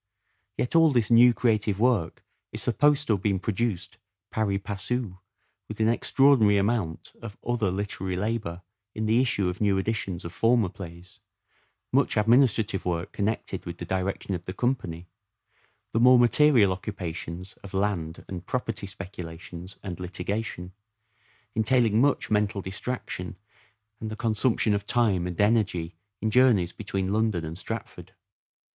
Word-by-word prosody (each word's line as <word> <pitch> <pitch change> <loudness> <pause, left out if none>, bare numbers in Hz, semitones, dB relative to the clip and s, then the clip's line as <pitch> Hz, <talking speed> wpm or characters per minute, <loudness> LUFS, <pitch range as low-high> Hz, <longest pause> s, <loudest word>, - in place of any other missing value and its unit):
Yet 125 - -2
all 165 -1 +7
this 120 -5 +1
new 120 +1 +8
creative 110 -4 +1
work 115 -8 +1 0.3
is - - -4
supposed 145 +4 +2
to 115 - +2
have 100 - -1
been 100 -1 +1
produced 100 -1 -3 0.3
pari 105 -3 0
passu 100 0 -3 0.5
with 110 - -8
an 110 - +3
extraordinary 120 -3 +4
amount 100 -5 -1
of 110 -3 -8
other 115 -4 0
literary 95 -1 -3
labour 95 -3 -3 0.3
in 110 - -2
the 115 +3 +3
issue 125 -7 +1
of 90 +3 -4
new 100 -2 +3
editions 95 -3 -2
of 85 - -6
former 115 -3 +3
plays, 90 -1 -11 0.7
much - - +2
administrative 110 -3 +3
work 85 -1 -2
connected 110 +2 -2
with 85 0 -6
the 85 - -6
direction 95 +2 -2
of 90 -1 -4
the 95 - -5
company, 90 -10 -2 0.9
the 115 - 0
more 125 +1 +7
material 120 -3 +5
occupations 90 -2 -5
of 100 - -9
land 95 -5 -2
and 90 -2 -7
property 115 -5 -3
speculations 90 -1 -8
and 90 -4 -6
litigation, 90 +1 -4 0.8
entailing 110 0 +3
much 140 -4 +1
mental 105 0 +1
distraction 95 -2 -4 0.6
and 110 - -5
the 110 - -5
consumption 110 0 +1
of 100 0 -1
time 105 -8 +2
and 90 -2 -6
energy 100 -6 +1 0.3
in 110 - +1
journeys 110 -8 +4
between 95 -2 -3
London 110 -6 0
and 80 +1 -6
Stratford. 110 +4 -7
105 Hz, 145 wpm, -26 LUFS, 90-115 Hz, 0.9 s, new